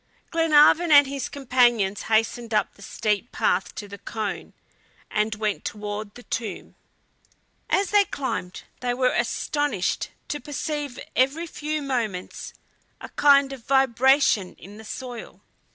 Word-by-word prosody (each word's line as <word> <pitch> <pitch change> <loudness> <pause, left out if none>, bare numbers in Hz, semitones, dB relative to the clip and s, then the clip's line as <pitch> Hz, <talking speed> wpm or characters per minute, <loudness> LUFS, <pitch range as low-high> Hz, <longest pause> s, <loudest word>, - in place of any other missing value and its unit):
Glenarvan 325 0 +5
and 285 -1 +8
his 275 -1 -4
companions 240 -7 +2
hastened 225 +1 +1
up - - +1
the - - -19
steep 210 0 -2
path 180 +1 0
to 205 - -7
the 200 0 -10
cone, 215 -3 -5 0.6
and 215 0 0
went 210 -1 -2
toward 210 0 -5
the 245 - -12
tomb. 220 -6 -5 1.0
As 395 0 +1
they 410 -1 +5
climbed 260 - -4 0.2
they 245 -1 -1
were 255 0 +2
astonished 290 -11 -1 0.2
to 295 - -2
perceive 290 -2 -4 0.2
every 275 +6 +2
few 305 -2 -4
moments 230 -9 -3 0.5
a - - -9
kind 280 -1 +4
of 255 -4 -12
vibration 265 -5 +3
in 205 +3 -13
the 220 - -11
soil. 245 +1 -8
245 Hz, 135 wpm, -24 LUFS, 210-285 Hz, 1.0 s, and